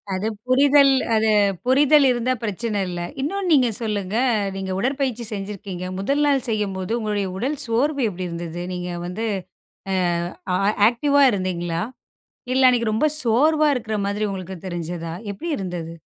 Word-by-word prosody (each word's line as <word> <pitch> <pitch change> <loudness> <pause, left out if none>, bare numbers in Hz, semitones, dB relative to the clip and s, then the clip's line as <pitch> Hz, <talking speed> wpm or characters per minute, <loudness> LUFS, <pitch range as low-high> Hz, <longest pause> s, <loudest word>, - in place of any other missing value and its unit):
அது 190 +3 -2 0.2
புரிதல் 280 +1 +5 0.2
அது 220 0 +2 0.4
புரிதல் 280 +2 +5
இருந்தா 250 +1 +1
பிரச்சன 210 0 -2
இல்ல. 175 -1 -4 0.2
இன்னொன்னு 370 +6 -2
நீங்க 255 -4 +4
சொல்லுங்க, 205 -2 -2 0.4
நீங்க 190 -1 -4
உடற்பயிற்சி 260 -2 -1
செஞ்சிருக்கீங்க. 195 -2 -6
முதல் 280 +9 0
நாள் 275 -2 +2
செய்யும்போது 195 -2 -2
உங்களுடைய 210 -2 -1
உடல் 270 +8 -2
சோர்வு 270 +5 0
எப்பிடி 185 -1 -5
இருந்தது? 170 0 -5
நீங்க 180 0 -4
வந்து 195 +6 -4 0.7
அ, - - 0 0.6
ஆ - - +3 0.3
ஆக்டிவா 285 +4 +2
இருந்தீங்களா? 175 -3 -2 0.7
இல்ல 260 0 +5
அன்னக்கி 235 -2 +2
ரொம்ப 240 +8 +2 0.2
சோர்வா 300 +7 +3
இருக்குற 220 -3 -3
மாதிரி 205 +1 -1
உங்களுக்கு 190 -1 -6
தெரிஞ்சதா? 170 -1 -5 0.2
எப்பிடி 330 - -5
இருந்தது? 175 -4 -5
215 Hz, 140 wpm, -22 LUFS, 185-265 Hz, 0.7 s, புரிதல்